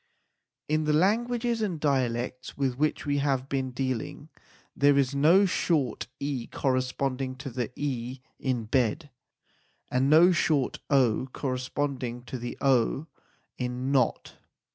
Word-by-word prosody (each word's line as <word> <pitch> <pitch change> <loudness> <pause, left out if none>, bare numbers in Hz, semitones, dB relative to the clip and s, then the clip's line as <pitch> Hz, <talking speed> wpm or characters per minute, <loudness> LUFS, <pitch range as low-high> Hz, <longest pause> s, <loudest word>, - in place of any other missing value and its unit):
In 155 +1 +1
the 150 - +2
languages 230 +7 +1
and 185 -7 -1
dialects 125 -3 -1
with 135 -3 0
which 150 +4 0
we 145 0 +1
have 135 -2 0
been 135 -1 -1
dealing 130 +3 -4 0.5
there 145 0 +4
is 135 -1 +2
no 165 +8 +5
short 155 - 0
e 140 -4 -3
corresponding 130 0 -1
to 135 0 -7
the 120 -1 -3
e 130 -2 -3 0.2
in 125 -3 -1
bed 130 +5 0 0.8
and 130 +2 +2
no 165 +4 +7
short 155 -5 +1
o 130 -3 +3
corresponding 130 -2 -3
to 125 0 -6
the 120 0 -6
o 135 +2 +2 0.5
in 125 +1 -2
not. 130 -4 0
135 Hz, 130 wpm, -27 LUFS, 125-150 Hz, 0.8 s, no